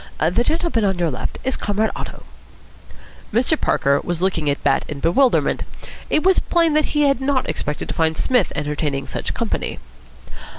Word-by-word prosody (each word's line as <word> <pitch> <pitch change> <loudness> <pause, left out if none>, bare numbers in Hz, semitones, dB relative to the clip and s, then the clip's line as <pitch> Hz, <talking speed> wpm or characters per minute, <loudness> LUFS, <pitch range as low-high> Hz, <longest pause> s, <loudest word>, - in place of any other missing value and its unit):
The 175 +9 +2
gentleman 320 -6 0
on 190 -2 +1
your 170 -3 0
left 125 - -4
is 260 0 0
Comrade 210 +2 0
Otto." - - -7 1.1
Mr. 245 +8 +2
Parker 140 +1 +2
was 175 -2 -2
looking 175 -5 0
at 140 - -2
Bat 135 -1 +2
in 145 - -6
bewilderment. 240 - +2 0.5
It 305 - +2
was 380 +1 +5
plain 335 -2 +2
that 305 0 +3
he 295 - +4
had 275 -3 +2
not 265 -1 0
expected 150 0 -3
to - - -2
find 160 -1 0
Psmith 250 -7 +2
entertaining 145 -2 -2
such - - -4
company. - - -2
195 Hz, 170 wpm, -21 LUFS, -, 1.1 s, was